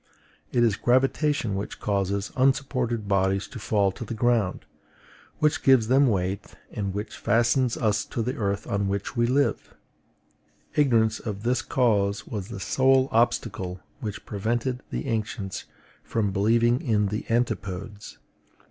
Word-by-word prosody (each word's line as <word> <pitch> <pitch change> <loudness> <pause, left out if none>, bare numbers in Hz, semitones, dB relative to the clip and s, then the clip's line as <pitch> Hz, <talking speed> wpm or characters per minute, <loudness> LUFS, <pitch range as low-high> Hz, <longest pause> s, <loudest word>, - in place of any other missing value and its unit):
It 120 - +3
is 110 -4 +2
gravitation 130 -1 +1
which 100 +1 -4
causes 100 0 -1
unsupported 125 -4 +1
bodies 95 0 +1
to 125 - -8
fall 100 -2 +1
to 105 - -8
the 115 +1 -5
ground, 115 -4 +1 0.7
which 150 0 +1
gives 130 -5 +4
them 135 +2 +5
weight, 95 -2 -2 0.2
and 100 -2 -3
which 105 +3 -5
fastens 120 +2 +2
us 105 -2 +1
to 115 - -3
the 125 +4 -2
earth 100 -6 -2
on 100 -1 -1
which 100 0 -3
we 120 0 +2
live. 140 +3 0 1.0
Ignorance 115 -7 +3
of 105 -3 -5
this 120 +1 +1
cause 105 -6 +1
was 100 -4 -5
the 110 -4 -7
sole 130 +5 +3
obstacle 105 -5 0 0.2
which 105 -3 -6
prevented 120 +5 -2
the - - -4
ancients 105 -5 -3 0.4
from 105 -3 -1
believing 115 +5 +2
in 105 -4 +1
the 105 +2 -3
antipodes. 105 -3 -2
110 Hz, 140 wpm, -26 LUFS, 100-125 Hz, 1.0 s, them